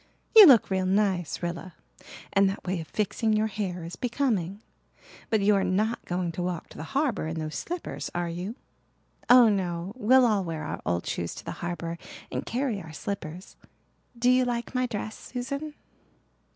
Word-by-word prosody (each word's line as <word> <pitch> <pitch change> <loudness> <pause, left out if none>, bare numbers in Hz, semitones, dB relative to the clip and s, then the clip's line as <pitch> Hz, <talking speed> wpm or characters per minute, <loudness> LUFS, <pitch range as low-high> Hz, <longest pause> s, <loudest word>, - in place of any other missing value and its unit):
You 430 -4 +12
look 240 -8 +6
real 190 -1 +1
nice, 190 -5 0
Rilla, 175 +1 -4 0.6
and 195 0 +5
that 195 - -5
way 180 -2 -1
of 160 - -9
fixing 215 +1 0
your 215 0 +2
hair 195 -5 -3
is 165 +1 -7
becoming. 220 -5 -1 0.7
But 220 -3 +2
you 205 +1 +4
are 195 -1 +2
not 210 +5 0
going 175 -1 -2
to 170 - -5
walk 175 -2 -3
to - - -13
the - - -5
harbour 280 - 0
in 160 +1 -4
those 155 -1 -4
slippers, 350 0 -4
are 175 0 -1
you?" 180 +6 -5 0.7
"Oh, 245 -1 +9
no. 185 -2 -1
We'll 255 +2 +5
all 210 -4 +2
wear 165 -3 -4
our - - -5
old 85 0 0
shoes 85 - -3
to - - -10
the - - -4
harbour 170 -1 -4 0.3
and - - -4
carry 240 -5 -1
our 160 - -10
slippers. 180 0 -6 0.6
Do 245 +1 +4
you 255 0 +4
like 240 0 -2
my 255 0 +1
dress, 215 -1 -4 0.2
Susan?" 280 +5 -4
200 Hz, 180 wpm, -27 LUFS, 175-235 Hz, 0.7 s, You